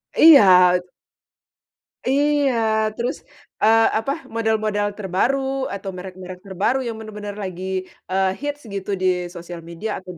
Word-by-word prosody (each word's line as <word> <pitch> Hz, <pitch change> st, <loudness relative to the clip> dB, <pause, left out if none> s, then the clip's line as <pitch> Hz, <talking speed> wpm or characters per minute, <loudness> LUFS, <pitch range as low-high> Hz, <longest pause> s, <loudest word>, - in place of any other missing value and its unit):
Iya. 180 Hz, -, +7 dB, 1.3 s
Iya 285 Hz, -1 st, +2 dB, 0.4 s
terus, 240 Hz, +1 st, -2 dB, 0.5 s
eee, 225 Hz, +1 st, +6 dB, 0.2 s
apa, 250 Hz, +5 st, -2 dB, 0.2 s
model-model 215 Hz, -2 st, 0 dB
terbaru 210 Hz, +7 st, 0 dB, 0.4 s
atau 195 Hz, 0 st, -6 dB
merek-merek 185 Hz, 0 st, -9 dB
terbaru 195 Hz, +7 st, 0 dB
yang 230 Hz, -, -4 dB
benar-benar 210 Hz, -2 st, -7 dB
lagi, 185 Hz, -1 st, -6 dB, 0.5 s
eee, 190 Hz, 0 st, +2 dB
hits 290 Hz, 0 st, -4 dB
gitu 195 Hz, +1 st, -4 dB
di 185 Hz, -, +2 dB, 0.3 s
sosial 175 Hz, 0 st, -8 dB
media 170 Hz, +6 st, -5 dB
atau 185 Hz, -1 st, -10 dB
205 Hz, 120 wpm, -21 LUFS, 185-230 Hz, 1.3 s, Iya